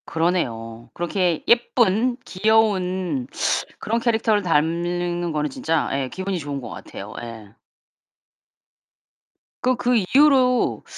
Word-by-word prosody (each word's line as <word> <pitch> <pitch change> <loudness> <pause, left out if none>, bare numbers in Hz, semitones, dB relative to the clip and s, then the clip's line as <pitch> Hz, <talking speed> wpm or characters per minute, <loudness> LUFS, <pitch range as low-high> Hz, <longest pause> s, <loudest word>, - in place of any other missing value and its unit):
그러네요. 120 -10 -2
그렇게 175 -1 -1
예쁜 240 0 +3
귀여운 185 - +1 0.5
그런 225 +2 -1
캐릭터를 225 -3 +1
닮는 175 +1 0
거는 150 -1 -1
진짜 160 +3 -1
예 135 -1 -1
기분이 190 +2 -3
좋은 145 -2 -5
것 - - -8
같아요. - - -9
예. 115 -3 -9 2.1
그 255 0 +2
그 245 0 +1
이후로 255 +3 +3
180 Hz, 220 characters per minute, -22 LUFS, 155-220 Hz, 2.1 s, 예쁜